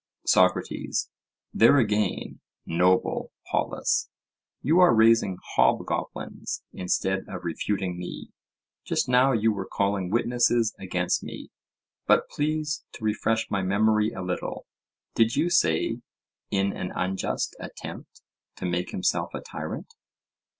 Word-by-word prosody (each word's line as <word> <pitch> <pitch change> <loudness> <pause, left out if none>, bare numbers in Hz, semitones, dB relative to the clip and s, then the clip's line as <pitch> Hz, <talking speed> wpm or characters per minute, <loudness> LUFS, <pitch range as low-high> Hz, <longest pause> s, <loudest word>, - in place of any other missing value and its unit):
SOCRATES: - - +2 0.4
There 115 +6 +6
again, 105 -5 0 0.3
noble 90 +2 +1 0.2
Polus, - - 0 0.5
you 160 +6 +4
are 180 -9 +6
raising 110 -4 +4 0.2
hobgoblins - - 0
instead 95 +1 -1
of 90 -1 -7
refuting 90 +1 -2
me; 90 - -7 0.5
just - - 0
now 125 +2 +4
you 110 -2 +2
were 95 -2 -5
calling 100 -2 0
witnesses 120 +1 +2
against 90 -1 -1
me. - - -9 0.6
But - - +4
please 150 0 -1
to 110 - -11
refresh 110 +1 0
my 100 - +1
memory 105 +3 +2
a 95 - -6
little; 90 0 -4 0.5
did 115 0 +3
you 175 - +1
say—"in 100 - -1
an 90 - -4
unjust 95 +1 -2
attempt - - -9 0.3
to - - -6
make 90 0 -1
himself 90 - -1
a - - -3
tyrant"? - - -7
105 Hz, 115 wpm, -26 LUFS, 95-115 Hz, 0.6 s, There